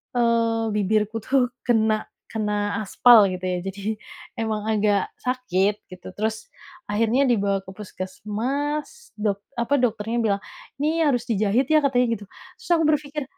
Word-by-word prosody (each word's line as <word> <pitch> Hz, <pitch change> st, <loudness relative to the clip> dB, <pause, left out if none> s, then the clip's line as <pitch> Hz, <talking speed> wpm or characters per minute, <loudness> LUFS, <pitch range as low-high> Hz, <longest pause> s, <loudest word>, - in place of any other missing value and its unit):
eee, 230 Hz, -2 st, +2 dB
bibirku 210 Hz, +2 st, +1 dB
tuh 255 Hz, -2 st, +2 dB, 0.2 s
kena 220 Hz, -2 st, +2 dB, 0.2 s
kena 210 Hz, -1 st, -1 dB
aspal 215 Hz, +1 st, +6 dB
gitu 185 Hz, 0 st, -5 dB
ya, 180 Hz, -1 st, -1 dB
jadi 200 Hz, +3 st, -4 dB, 0.4 s
emang 215 Hz, -2 st, -2 dB
agak 205 Hz, -2 st, +1 dB
sakit 210 Hz, -6 st, 0 dB
gitu. 180 Hz, -1 st, -10 dB
Terus 220 Hz, -, -3 dB, 0.4 s
akhirnya 230 Hz, +6 st, +2 dB
dibawa 200 Hz, -4 st, +2 dB
ke 190 Hz, -, -10 dB
puskesmas 250 Hz, -, -4 dB
dok 205 Hz, -1 st, -1 dB, 0.2 s
apa 235 Hz, +5 st, +1 dB
dokternya 225 Hz, 0 st, 0 dB
bilang, 200 Hz, -2 st, +1 dB, 0.4 s
"Ini 310 Hz, 0 st, +2 dB
harus 245 Hz, -2 st, 0 dB
dijahit 220 Hz, +4 st, +1 dB
ya." 310 Hz, 0 st, +5 dB
katanya 250 Hz, -3 st, +3 dB
gitu, 205 Hz, -, -10 dB, 0.3 s
terus -, -, -14 dB
aku 330 Hz, -1 st, +4 dB
berpikir, 295 Hz, -1 st, 0 dB
220 Hz, 140 wpm, -24 LUFS, 205-250 Hz, 0.4 s, aspal